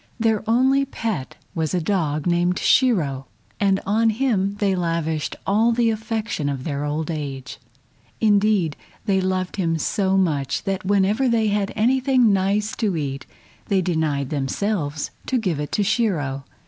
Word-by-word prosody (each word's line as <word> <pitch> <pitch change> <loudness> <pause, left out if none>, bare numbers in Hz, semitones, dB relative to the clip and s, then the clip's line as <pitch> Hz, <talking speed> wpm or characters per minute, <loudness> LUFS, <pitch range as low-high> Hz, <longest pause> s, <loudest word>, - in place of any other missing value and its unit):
Their 220 -2 +1
only 265 +4 +4
pet 220 - -4 0.2
was 160 +1 -1
a - - +2
dog 155 -4 -1
named 175 +1 +2
Shiro, 150 - +2 0.3
and 195 -1 +2
on 220 +3 +2
him 210 -4 0
they 205 -2 +1
lavished 165 -3 -1
all 220 +4 +3
the 230 -1 +2
affection 220 -8 -2
of 135 -2 -4
their 145 -1 -3
old 150 +2 -2
age. 140 -4 -5 0.6
Indeed, 205 -7 +3 0.3
they 195 -3 +2
loved 185 0 -2
him 165 -4 0
so 190 +4 +1
much 150 -8 0
that 195 -2 -2
whenever 205 +6 +2
they 225 -2 +2
had 205 -1 0
anything 255 0 +3
nice 200 +3 0
to 205 -7 0
eat 140 -2 -4 0.4
they 195 -2 +2
denied 155 -6 -1
themselves 150 +1 -2 0.2
to 260 - +1
give 185 -10 -1
it 150 - -4
to 205 - +2
Shiro. 155 - 0
190 Hz, 150 wpm, -22 LUFS, 155-215 Hz, 0.6 s, only